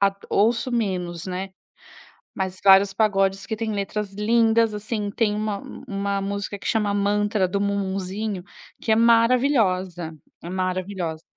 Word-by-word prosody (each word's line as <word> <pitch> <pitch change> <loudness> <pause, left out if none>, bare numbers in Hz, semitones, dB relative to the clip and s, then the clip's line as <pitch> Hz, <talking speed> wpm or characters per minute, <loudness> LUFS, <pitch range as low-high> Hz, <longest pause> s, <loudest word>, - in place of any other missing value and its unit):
a 200 0 +3 0.2
ouço 230 +4 +2
menos, 180 -7 -2
né, 185 +1 -4 0.9
mas 190 -1 -3
vários 195 0 +6
pagodes 195 -2 +1
que 220 - -3
têm 220 -1 -3
letras 200 0 -3
lindas, 225 +1 +3
assim, 210 0 -3
tem 210 0 0
uma 210 -1 -2 0.3
uma 200 0 -2
música 200 0 -4
que - - -6
chama: 210 -2 +1
Mantra 205 0 +1
do 200 +2 -2
Mumuzinho 195 0 -2 0.4
que 225 - 0
é - - +6
maravilhosa, 230 - +3 0.3
é 170 - -6
maravilhosa. 185 -3 -3
200 Hz, 135 wpm, -23 LUFS, 190-220 Hz, 0.9 s, vários